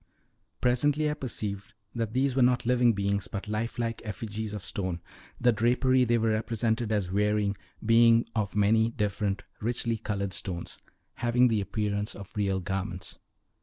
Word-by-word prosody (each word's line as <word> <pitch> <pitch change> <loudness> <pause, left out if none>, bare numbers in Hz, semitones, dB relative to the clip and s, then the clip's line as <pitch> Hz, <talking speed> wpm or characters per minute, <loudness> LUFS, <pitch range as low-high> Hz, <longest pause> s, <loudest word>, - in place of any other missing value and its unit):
Presently 145 +5 +2
I - - 0
perceived 105 -7 -4 0.2
that 115 -2 -3
these 130 0 +1
were 135 - +3
not 125 -1 +3
living 120 -1 +4
beings, 100 -1 -1
but 100 0 -6
life 110 +2 -2
like 115 -1 -2
effigies 105 0 -5
of 100 - -6
stone, 95 -4 -3 0.4
the 120 0 +4
drapery 125 +3 +3
they 120 0 +3
were 115 -1 +1
represented 110 +1 0
as 100 -4 0
wearing 105 0 +1 0.3
being 115 +1 +6
of 105 -3 -1
many 110 +2 +4
different 105 -2 -2 0.2
richly 115 0 -1
colored 100 -3 -3
stones, 85 -4 -3 0.4
having 120 +1 +3
the 110 -2 +1
appearance 105 +1 -2
of 100 -2 -11
real 100 -2 0
garments. 95 0 -4
110 Hz, 155 wpm, -28 LUFS, 100-120 Hz, 0.4 s, being